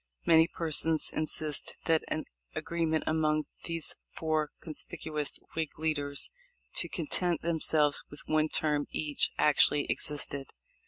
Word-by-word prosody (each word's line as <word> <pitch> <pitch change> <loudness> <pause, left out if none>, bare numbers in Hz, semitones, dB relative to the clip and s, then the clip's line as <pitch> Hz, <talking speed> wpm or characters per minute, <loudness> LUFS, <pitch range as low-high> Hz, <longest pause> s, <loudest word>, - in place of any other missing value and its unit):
Many 160 0 +6
persons 160 -1 +3
in 155 - 0
sist 150 -2 0
that 160 -1 +3
an 155 - -2 0.3
agreement 165 -2 -1
among 155 -1 +1 0.2
these 165 -2 -3
four 155 -2 -1
conspicuous 155 -1 -4 0.2
Whig 160 -2 -3
leaders 145 -3 +1 0.5
to - - +1
content 180 - -1
themselves 155 -3 +2
with 145 - -10
one 155 0 +2
term 150 -2 +1
each 150 -2 0
actually 150 0 +4
ex - - +1
isted. 140 -2 -4
155 Hz, 125 wpm, -30 LUFS, 150-160 Hz, 0.5 s, Many